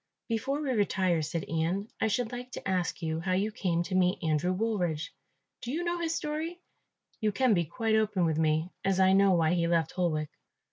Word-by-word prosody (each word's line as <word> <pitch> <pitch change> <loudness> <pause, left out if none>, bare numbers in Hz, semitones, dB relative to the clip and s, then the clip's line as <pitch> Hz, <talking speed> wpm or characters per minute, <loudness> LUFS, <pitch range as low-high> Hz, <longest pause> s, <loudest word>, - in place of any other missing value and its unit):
"Before 260 +6 -1
we 290 -3 -1
retire," 190 -6 +1
said 155 +1 -3
Ian, 165 +6 -1
"I 225 - +3
should 225 +2 -1
like 245 +1 -7
to - - -6
ask 185 -2 -1
you 160 0 -1
how 185 +2 -1
you 200 +4 +1
came 175 -4 0
to 185 - -6
meet 180 -1 +3
Andrew 160 +2 +1
Woolridge. 180 -6 -1 0.5
Do 240 - -4
you 330 +5 -1
know 345 0 -1
his 330 -1 -1
story? 315 +4 -3 0.6
You 215 -2 +1
can 255 +2 +3
be 175 -3 +2
quite 225 +7 -1
open 215 -4 +2
with 160 -1 0
me, 160 +2 +1
as 190 -1 +1
I 190 0 +5
know 195 0 +5
why 165 -1 +3
he 170 -1 +1
left 170 -1 +1
Holwick." 155 -5 -1
185 Hz, 205 wpm, -29 LUFS, 165-225 Hz, 0.6 s, I